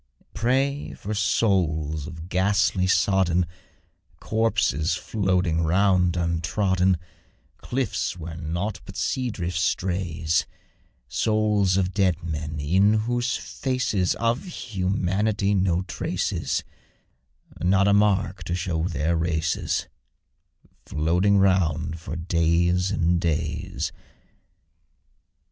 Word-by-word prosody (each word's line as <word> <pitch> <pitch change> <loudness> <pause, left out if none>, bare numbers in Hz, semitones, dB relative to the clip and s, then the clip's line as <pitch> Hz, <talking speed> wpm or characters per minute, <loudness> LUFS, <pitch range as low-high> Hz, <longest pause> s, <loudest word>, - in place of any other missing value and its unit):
Pray 135 +4 0
for 105 - -5
souls 80 -8 +1
of 80 -1 -8
ghastly, 95 0 +2
sodden 95 -2 +2 0.7
Corpses, 110 - +1
floating 90 -5 0
round 90 +1 +3
untrodden 90 +2 +1 0.6
Cliffs, 125 -7 -2
where 85 -1 -7
nought 85 +6 -3
but - - -11
sea 130 -1 -1
drift 90 -5 -3
strays; 90 -3 0 0.6
Souls 105 - +1
of 95 -1 0
dead 95 -4 +1
men, 75 -2 -4
in 95 +8 +3
whose 120 +1 0
faces 125 -9 -1
Of 115 +7 0
humanity 100 - -1
no 90 -2 +1
trace - - -2
is - - -1 1.0
Not 95 +2 +4
a 100 - +4
mark 100 -3 +2
to 85 - -1
show 85 -2 -1
their 80 0 0
races 80 -1 -1 1.0
Floating 90 +6 +2
round 85 -5 +2
for 80 - -6
days 85 +2 +1
and 85 -3 +1
days. 80 -4 -2
90 Hz, 100 wpm, -25 LUFS, 85-100 Hz, 1.0 s, Not